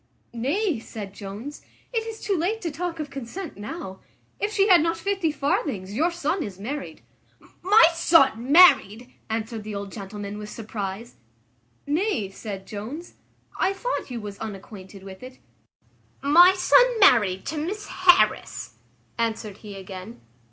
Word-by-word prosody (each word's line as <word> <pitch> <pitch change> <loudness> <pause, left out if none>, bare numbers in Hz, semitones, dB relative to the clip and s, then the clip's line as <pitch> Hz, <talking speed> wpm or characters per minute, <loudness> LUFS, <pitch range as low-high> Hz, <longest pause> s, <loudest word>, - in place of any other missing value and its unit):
"Nay," 290 - 0
said 210 -3 -8
Jones, 210 +9 -8 0.3
"it 450 -1 -1
is 445 -1 -7
too 400 - -1
late 370 +7 -1
to 335 - -3
talk 335 +2 -4
of 295 -2 -5
consent 275 +7 -7
now; 205 - -7 0.4
if 415 - -1
she 405 -2 +3
had 360 -5 +7
not 330 +1 0
fifty 385 -2 -1
farthings 270 -9 -2
your 315 +10 +2
son 345 +1 -2
is 200 - -5
married." 275 +8 -6 0.6
"My 390 -1 +7
son 275 -7 +3
married!" 255 - +6 0.2
answered 220 0 -3
the 210 -1 -6
old 200 -1 -5
gentleman, 205 0 -7
with 210 0 -7
surprize. 210 - -6 0.7
"Nay," 295 - 0
said 195 -1 -7
Jones, 235 - -7 0.5
"I 380 +1 +2
thought 485 - -3
you 245 -2 -5
was 205 -2 -8
unacquainted 195 -2 -9
with 190 -1 -11
it." 255 +1 -11 0.9
"My 350 +6 +7
son - - +4
married 210 - +5
to 310 +1 -3
Miss 405 +7 -4
Harris!" 370 -2 +2 0.4
answered 220 -3 -2
he 210 -2 -10
again. 190 +3 -9
255 Hz, 145 wpm, -24 LUFS, -, 0.9 s, had